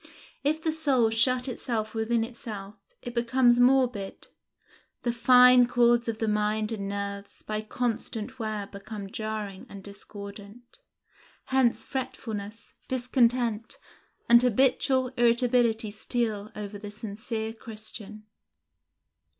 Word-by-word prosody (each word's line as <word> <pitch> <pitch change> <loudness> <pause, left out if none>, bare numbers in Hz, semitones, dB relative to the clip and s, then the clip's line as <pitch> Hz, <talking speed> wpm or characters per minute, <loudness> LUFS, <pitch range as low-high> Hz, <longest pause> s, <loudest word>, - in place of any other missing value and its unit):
If 310 +3 0
the 320 - +1
soul 270 -8 +2
shut 250 +3 +2
itself 225 -3 -3
within 225 +1 0
itself, 215 -4 -7 0.3
it 245 - -6
becomes 240 +1 +3
morbid; 245 -6 +2 0.7
the 240 - +1
fine 250 +1 +6
chords 240 -1 +3
of 225 -1 -2
the 225 - -1
mind 210 +1 0
and 200 -3 -3
nerves 200 0 -5
by 215 0 -3
constant 235 +2 -3
wear 215 -2 -3
become 200 0 -8
jarring 215 -3 -5
and 200 -1 -10
discordant; 200 - -11 0.7
hence 240 -4 +2
fretfulness, 225 -4 -6
discontent, 240 -3 +1 0.5
and 235 0 +7
habitual 260 +1 +2
irritability 235 -2 +2
steal 215 -1 -2
over 205 -1 -6
the 205 0 -7
sincere 220 +1 -5
Christian. 215 -1 -9
225 Hz, 110 wpm, -27 LUFS, 210-245 Hz, 0.7 s, and